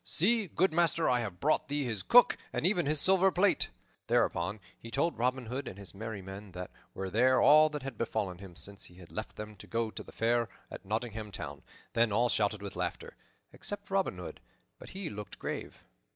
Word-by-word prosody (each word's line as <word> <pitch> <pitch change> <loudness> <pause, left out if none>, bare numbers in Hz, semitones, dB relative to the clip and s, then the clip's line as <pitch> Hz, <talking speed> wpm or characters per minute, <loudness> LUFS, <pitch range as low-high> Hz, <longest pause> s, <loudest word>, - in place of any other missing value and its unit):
See, 215 +4 +3
good 175 +2 +1
master! 165 -1 +3
I 125 -1 +3
have 100 -7 -4
brought 155 +7 +2
thee 145 0 0
his 110 -6 -1
cook, 245 - +7 0.2
and - - -2
even 180 -4 +2
his 155 0 +2
silver 190 +3 +5
plate." 185 +2 +3 0.4
Thereupon 90 +5 +1 0.2
he 115 - -11
told 145 +6 0
Robin 125 +1 +1
Hood 130 +5 -4
and 95 - -7
his 100 -1 -9
merry 105 -1 -6
men 95 0 -9
that 90 0 -6 0.2
were 95 -1 -4
there, 130 +5 +4
all 155 +3 +7
that 150 -2 -5
had 135 -4 -6
befallen 105 -6 -2
him 95 -3 -11
since 100 +2 -6
he 90 - -15
had 90 -2 -14
left - - -5
them 105 0 -7
to - - -11
go 115 -1 -1
to - - -6
the - - -12
Fair 115 -1 +1 0.2
at - - -8
Nottingham 110 0 -3
Town. - - -6 0.3
Then 115 -2 +3
all 120 +4 +3
shouted 105 -2 +1
with 100 - -6
laughter, - - -4 0.4
except 205 -1 -6
Robin 195 - +1
Hood; 90 - -8 0.4
but - - -10
he 190 -2 -5
looked 105 -6 -7
grave. - - -5
115 Hz, 210 wpm, -31 LUFS, 100-155 Hz, 0.4 s, cook